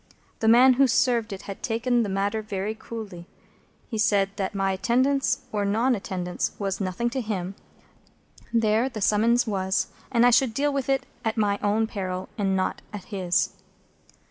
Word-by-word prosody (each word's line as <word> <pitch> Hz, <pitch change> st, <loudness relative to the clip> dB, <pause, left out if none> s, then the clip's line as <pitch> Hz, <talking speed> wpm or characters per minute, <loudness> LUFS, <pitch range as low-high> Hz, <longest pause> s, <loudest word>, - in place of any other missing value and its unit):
The 220 Hz, -, 0 dB
man 250 Hz, +3 st, +7 dB
who 270 Hz, +2 st, +4 dB
served 235 Hz, -2 st, +2 dB
it 195 Hz, -, -7 dB
had 195 Hz, -, -8 dB
taken 240 Hz, +1 st, +1 dB
the 215 Hz, -, -1 dB
matter 200 Hz, +3 st, -1 dB
very 210 Hz, 0 st, -3 dB
coolly. 215 Hz, -6 st, -8 dB, 0.6 s
He 225 Hz, -, -4 dB
had -, -, +1 dB
said 205 Hz, -4 st, +3 dB
that 195 Hz, 0 st, -3 dB
my 195 Hz, 0 st, +1 dB
attendance 260 Hz, +6 st, +1 dB
or 210 Hz, -1 st, -1 dB
non 225 Hz, +6 st, +2 dB
attendance 180 Hz, -4 st, -3 dB
was 195 Hz, -1 st, -3 dB
nothing 195 Hz, +6 st, -1 dB
to 260 Hz, 0 st, -2 dB
him; 195 Hz, -4 st, -3 dB, 1.0 s
there 225 Hz, +2 st, +2 dB
the 235 Hz, -5 st, -7 dB
summons 225 Hz, +4 st, +3 dB
was; 190 Hz, -3 st, -1 dB, 0.2 s
and 235 Hz, -1 st, +4 dB
I 245 Hz, -, +6 dB
should 245 Hz, -1 st, +3 dB
deal 290 Hz, +2 st, +1 dB
with 275 Hz, -1 st, -2 dB
it 270 Hz, -1 st, +1 dB, 0.2 s
at 225 Hz, 0 st, -1 dB
my 205 Hz, -2 st, +1 dB
own 210 Hz, +2 st, +2 dB
peril, 185 Hz, -4 st, -4 dB
and 195 Hz, -2 st, 0 dB
not 185 Hz, -, -1 dB
at 205 Hz, -3 st, -7 dB
his. 185 Hz, -1 st, +1 dB
215 Hz, 175 wpm, -25 LUFS, 195-240 Hz, 1.0 s, man